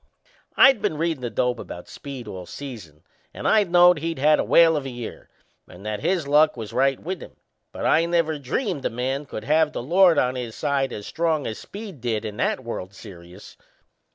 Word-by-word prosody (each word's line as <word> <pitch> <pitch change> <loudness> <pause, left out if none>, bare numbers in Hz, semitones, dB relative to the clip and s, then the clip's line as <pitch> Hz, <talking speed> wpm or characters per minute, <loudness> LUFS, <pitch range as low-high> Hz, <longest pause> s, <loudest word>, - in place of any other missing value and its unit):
I'd 265 -5 +6
been 155 - -1
readin' 165 -3 -1
the 120 - -3
dope 125 +2 -1
about 90 - -9
Speed 135 -5 -9
all 90 -3 -8
season, 105 - -9 0.3
and - - -3
I 220 -1 +5
knowed 175 -1 +5
he'd 165 +1 -3
had 150 +3 +4
a - - +2
whale 165 -1 +5
of 145 - -1
a - - -4
year 120 -2 -8 0.4
and 90 +3 -14
that 105 -1 -3
his 175 - 0
luck 150 0 +4
was 110 -3 -7
right 135 0 +2
with 185 +1 -5
him; - - -12 0.4
but - - -5
I 165 +2 +4
never 165 -3 0
dreamed 145 - -2
a - - 0
man 130 +4 -3
could 110 - -7
have 155 +1 +2
the - - -4
Lord 175 +4 +4
on 125 0 +2
his 125 -3 -6
side 140 -1 -1
as 105 - -7
strong 160 -1 -1
as 110 - -5
Speed 200 - -9
did 115 -2 -2
in 105 -1 -6
that 130 - -1
World's 100 -4 -6
Serious! 90 -2 -13
135 Hz, 210 wpm, -23 LUFS, 115-165 Hz, 0.4 s, I'd